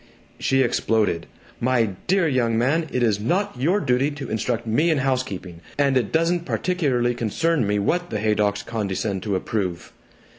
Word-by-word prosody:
She 135 0 +2
exploded. 105 -10 0 0.3
"My 120 -3 +2 0.2
dear 190 -2 +3
young 120 -5 +1
man, 150 +8 +1
it 125 - 0
is 105 -4 +2
not 185 - 0
your 180 +9 +3
duty 130 -4 +1
to 145 -1 -7
instruct 115 +2 -1
me 130 +10 +2
in 160 - +3
housekeeping, 115 -10 -2 0.2
and 140 -2 +2
it 120 -5 +1
doesn't 165 +1 +1
particularly 140 -10 0
concern 120 +4 0
me 105 0 +1
what 175 - 0
the 110 - -2
Haydocks 105 -1 +1
condescend 100 -3 -2
to 100 0 -1
approve!" 95 -3 -3
120 Hz, 160 wpm, -23 LUFS, 105-150 Hz, 0.3 s, dear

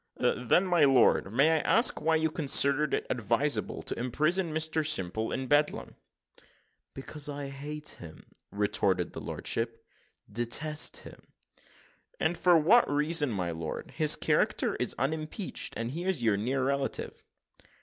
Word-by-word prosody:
"Then, 125 +10 +1
my 175 -4 +2
lord, 130 -7 +3
may 150 +7 +3
I - - +1
ask 230 +9 +3
you - - -12
why 160 - +4
you 160 0 0
considered 140 -1 +3
it - - -4
advisable 120 +5 -1
to - - -3
imprison 155 +8 0
Mr 160 0 0
Simple 110 - -1
in 130 - -3
Bedlam?" 145 +3 0 1.0
"Because 145 +2 -6
I 140 -1 -5
hate 150 +2 -6
him," 80 -2 -12 0.3
retorted 100 -3 0
his - - -7
lordship, 115 0 -3 0.4
"detest 120 +8 0
him." - - -11 1.0
"And 175 - 0
for 175 -1 +4
what 195 +10 +4
reason, 150 0 +1
my 90 -6 -3
lord? 80 -1 -6
his - - +3
character - - 0
is - - -2
unimpeached, 155 - -3
and 115 +1 -3
he 170 +5 -5
is 185 -10 -1
your 110 -3 +3
near 130 +6 -1
relative." 140 0 -3
140 Hz, 145 wpm, -29 LUFS, 115-155 Hz, 1.0 s, why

